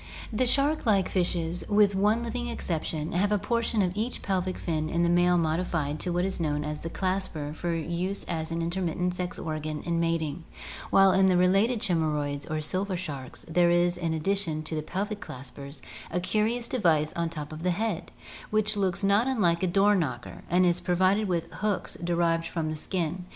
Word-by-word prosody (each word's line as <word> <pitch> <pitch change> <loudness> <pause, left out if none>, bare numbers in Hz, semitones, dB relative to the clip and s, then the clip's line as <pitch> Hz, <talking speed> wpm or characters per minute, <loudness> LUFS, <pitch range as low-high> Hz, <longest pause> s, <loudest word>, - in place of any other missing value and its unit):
The 250 +4 +2
shark 280 +3 +2
like 200 -3 +4
fishes, 175 -2 0
with 205 -1 +4
one 210 +4 +2
living 240 +1 -3
exception, 160 -8 -3
have 200 +4 +1
a 210 - +4
portion 230 +1 0
of 180 - 0
each 220 +5 -3
pelvic 185 -1 -1
fin 155 -2 -2
in 170 +1 +1
the 170 - +3
male 175 0 +4
modified 160 -2 0
into 155 +4 -3
what 175 +1 +1
is 190 -1 -2
known 150 -2 0
as 150 0 -4
the 165 - -4
clasper 185 -5 -2
for 170 +2 -2
use 170 +4 -2
as 160 -2 -3
an 165 0 -1
intro 170 +3 -2
mittent 180 +1 -2
organ 155 -1 -3
in 170 -1 0
mating, 165 -1 -1 0.5
while 195 0 +6
in 190 0 +4
the 185 -1 +4
related 195 +6 +3
chimajroids 150 -6 -1
or 155 0 -1
silver 185 +5 -1
sharks 145 -7 -6
there 175 +1 +3
is 175 0 +3
in 165 -2 -2
addi 195 +6 +1
tion 160 -5 -2
to 155 - -4
the 155 - -1
pelvic 205 +6 -3
claspers 140 +3 -9 0.3
a 180 - -1
curious 220 +6 0
device 160 -10 +2
on 170 0 -1
the 165 - -5
top 150 0 -6
of 155 - -7
the 180 - +1
head, 195 0 -2 0.4
which 215 0 +2
looks 195 -1 0
not 200 +5 +3
un 265 -3 0
like 170 -3 +3
a 185 - +2
door 200 +3 +4
knocker 135 -11 -2
and 180 +2 +4
is 175 0 +2
pro 180 - 0
vided 190 +4 +3
with 170 -3 0 0.2
hooks 210 -3 -1
derived 170 -1 +1
from 160 -2 -2
the - - -3
skin. 175 +2 -2
175 Hz, 205 wpm, -27 LUFS, 160-195 Hz, 0.5 s, while